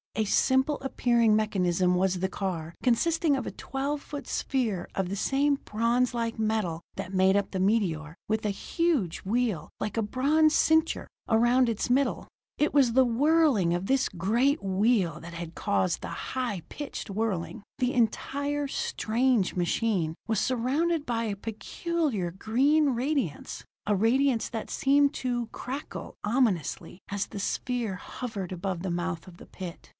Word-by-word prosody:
A 220 - +1
simple 265 +7 +2
appearing 235 -4 +3
mechanism 180 -4 +2
was 185 0 +1
the 190 - +1
car, 170 -5 -4
consisting 305 +4 +2
of - - -3
a - - -3
twelve 280 +2 -3
foot 290 -1 -7
sphere 225 -10 -1
of 190 -2 -1
the 195 - -3
same 280 +7 +2
bronze 235 +3 +1
like 230 -1 -2
metal 215 -7 -1
that 185 - -6
made 190 +1 +4
up 200 - -1
the 190 - -2
meteor, 180 -7 +1
with 220 +1 0
a - - +2
huge 245 - 0
wheel, 210 -6 -1
like 210 - -3
a - - +3
bronze 295 +8 +3
cincture, 320 +1 +2 0.2
around 240 +2 +4
its 225 0 -2
middle. 265 +3 +1 0.3
It 300 - +1
was 270 -5 +5
the 260 +2 +5
whirling 260 - +3
of 175 +2 -1
this 265 +4 +2
great 230 - +1
wheel 195 -4 +2
that 170 +1 -9
had 165 -1 -7
caused 185 -3 0
the - - -5
high 235 -9 -3
pitched 290 -6 -6
whirring. 200 -1 -2
The 255 -1 0
entire, 285 +5 0
strange 235 -4 0
machine 175 -2 0
was 220 -3 +1
surrounded 290 +6 0
by 230 -1 -1
a 210 -2 -2
peculiar 225 - -2
green 275 - +2
radiance, 255 - -2 0.2
a 210 - +2
radiance 235 +4 +2
that 225 -2 -5
seemed 280 +1 +3
to 240 -2 -2
crackle 265 +6 -7
ominously 205 - 0
as 200 0 -2
the 200 - -7
sphere 230 +1 -2
hovered 200 -1 -6
over 185 +1 -2
the 180 +1 -3
mouth 175 -1 -3
of 175 -2 -13
the - - -12
pit. 180 -3 -9
225 Hz, 155 wpm, -28 LUFS, 190-265 Hz, 0.3 s, was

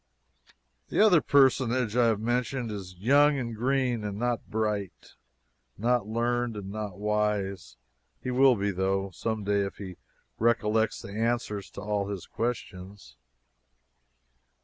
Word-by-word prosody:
The - - -1
other 200 -7 +6
personage 130 -5 +3
I 120 -1 +4
have 110 -2 +1
mentioned 120 +1 -1
is 95 -3 -7
young 140 +8 +4
and 115 -3 -4
green, 125 -1 0
and 100 -1 -4
not 120 +1 -2
bright, 105 -3 -3 0.6
not 120 0 +1
learned, 120 0 -1
and 100 -1 -6
not 105 -3 -5
wise. 105 -7 -1 0.4
He 125 - -4
will 130 0 +5
be, 100 -1 -1
though, 95 +1 -1
someday 105 0 -1
if 100 - -5
he 95 -3 -8 0.4
recollects 110 -1 +1
the - - -8
answers 110 -2 -2
to - - -7
all 105 -1 -1
his 100 -3 -5
questions. 100 -5 -5
110 Hz, 130 wpm, -28 LUFS, 100-120 Hz, 0.6 s, other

